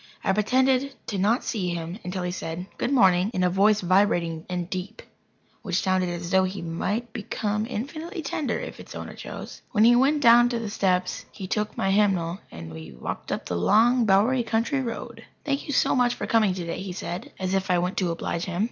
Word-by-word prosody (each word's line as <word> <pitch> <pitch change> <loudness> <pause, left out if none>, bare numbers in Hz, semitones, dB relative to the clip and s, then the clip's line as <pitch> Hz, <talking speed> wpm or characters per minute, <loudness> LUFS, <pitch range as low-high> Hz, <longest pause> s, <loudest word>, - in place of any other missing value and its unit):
I 195 - +2
pretended 260 +6 +2 0.2
not 205 +6 +2
to - - -10
see 180 -6 -1
him 170 +4 -5
until 180 0 -4
he 180 - -2
said 175 0 -5
"Good - - 0
morning," 190 -7 +4
in 185 - +1
a 180 - +3
voice 205 +3 +4
vibrating 175 -3 +1
and 180 -1 -2
deep, 190 +5 -6 0.6
which 190 -4 -1
sounded 185 -1 +1
as 175 0 -5
though 190 -1 +5
it 185 0 -3
might 205 +8 -3
become 215 -1 -2
infinitely 310 - -5
tender 285 0 -2
if - - -7
its - - -10
owner - - -6
chose. - - -8
When 215 -1 +4
we 240 +1 +7
went 285 +4 +3
down 240 0 +7
the 230 -3 -3
steps 185 -3 0
he 190 - -7
took 210 +3 -2
my 195 - +1
hymnal, 190 -4 +2
and 80 0 -9
we 80 -3 -9
walked - - -5
up - - -3
the 90 - -3
long, 230 - +4
bowery 215 +7 +4
country 230 +4 0
road. 235 -1 -6 0.2
"Thank 280 -1 -1
you - - -2
so - - +3
much 245 -1 +2
for - - -4
coming 215 -5 +3
today," 170 -1 -4
he 190 -2 -5
said 175 0 -6
as 185 0 -2
if 190 0 0
I 180 - +4
went 180 +2 -1
to 185 -3 +1
oblige 165 0 -3
him. 180 -2 -4
195 Hz, 210 wpm, -25 LUFS, 180-235 Hz, 0.6 s, we